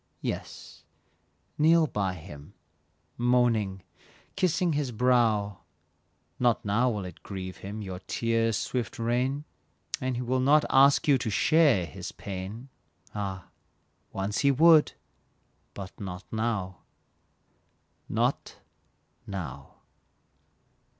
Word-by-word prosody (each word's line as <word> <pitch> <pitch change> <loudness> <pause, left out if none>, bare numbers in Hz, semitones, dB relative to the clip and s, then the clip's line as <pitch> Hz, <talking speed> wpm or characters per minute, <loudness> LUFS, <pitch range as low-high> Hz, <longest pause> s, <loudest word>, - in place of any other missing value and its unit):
Yes, - - -6 0.8
kneel 160 +2 +5
by 100 -9 -2
him, 75 -3 -12 0.6
moaning, 115 -6 +1 0.5
kissing 180 -3 +1
his 145 -3 -1
brow, 110 -5 +2 0.8
Not 120 -3 +2
now 115 +5 +2
will 105 -5 -3
it 90 -3 -10
grieve 95 -1 -7
him, 105 +2 -7
your 95 -2 -6
tears' 115 -1 +1
swift 125 -2 -3
rain, 125 +5 -1 0.6
And 130 -1 -1
he 125 - -3
will 130 +2 0
not 145 +4 +4
ask 140 +2 +5
you 140 -3 +5
to 115 - -2
share 135 - +3
your - - -9
pain; 100 +6 -7 0.4
Ah! 95 -3 -5 0.6
Once 100 +1 -2
he 140 - +4
would, 155 +3 +6 0.8
but 95 -1 -7
not 95 -2 -6
now 105 -6 -2 1.3
not - - -1 0.7
now. 75 -9 -7
115 Hz, 105 wpm, -28 LUFS, 95-130 Hz, 1.3 s, would